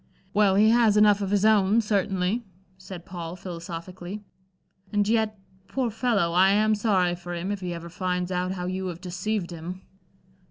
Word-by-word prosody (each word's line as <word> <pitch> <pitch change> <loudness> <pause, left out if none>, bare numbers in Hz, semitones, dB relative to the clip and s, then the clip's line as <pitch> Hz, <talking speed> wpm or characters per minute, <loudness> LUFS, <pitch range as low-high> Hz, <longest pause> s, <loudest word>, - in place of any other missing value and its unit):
"Well 200 -2 +4
he 215 +2 +5
has 230 -3 +4
enough 210 -1 +5
of 195 - -2
his 205 +1 +2
own, 215 0 +4
certainly," 205 0 0 0.3
said 185 -2 -10
Paul, 175 -1 -6
philosophically. 180 +2 -7 0.7
"And 205 -1 +1
yet, 220 -1 +1 0.3
poor 255 -4 -1
fellow, 210 -6 +1
I 185 +2 +5
am 215 +2 +3
sorry 195 -5 +2
for 175 0 -6
him 175 +4 -3
if 205 - -3
he 180 -2 -4
ever 170 0 -6
finds 180 +1 -2
out 180 +1 -1
how 180 -2 -4
you 185 +1 -3
have 175 -2 -5
deceived 185 +1 -3
him." 175 +3 -7
190 Hz, 170 wpm, -26 LUFS, 180-210 Hz, 0.7 s, he